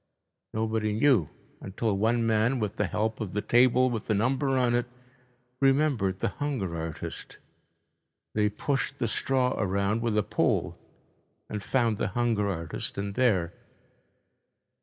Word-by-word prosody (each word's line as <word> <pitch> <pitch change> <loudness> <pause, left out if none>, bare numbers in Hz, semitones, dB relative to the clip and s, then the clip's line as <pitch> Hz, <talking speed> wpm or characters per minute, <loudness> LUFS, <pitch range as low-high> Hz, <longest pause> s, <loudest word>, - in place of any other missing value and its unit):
Nobody 110 -1 -1
knew, 115 - +3 0.3
until 100 +2 -2
one 115 +3 +1
man, 115 +4 +2
with 105 -4 -3
the - - +1
help 110 +1 -2
of 100 -5 -4
the 105 - +1
table 125 +1 +4
with 115 -3 -4
the 110 - +2
number 130 +5 +1
on 125 -2 +2
it, 120 0 +1 0.7
remembered 135 -9 +2
the - - +1
hunger 130 -13 -3
artist. 80 -1 -6 1.0
They 105 -1 +2
pushed 135 +6 -2
the 120 - -1
straw 125 +3 +1
around 100 +2 0
with 115 -2 0
a 105 - +3
pole - - 0 0.7
and 105 -1 -4
found 115 -1 +1
the - - 0
hunger 115 -4 +1
artist 85 -4 -4
in 100 0 -3
there. 100 -9 +2
110 Hz, 140 wpm, -28 LUFS, 100-125 Hz, 1.0 s, table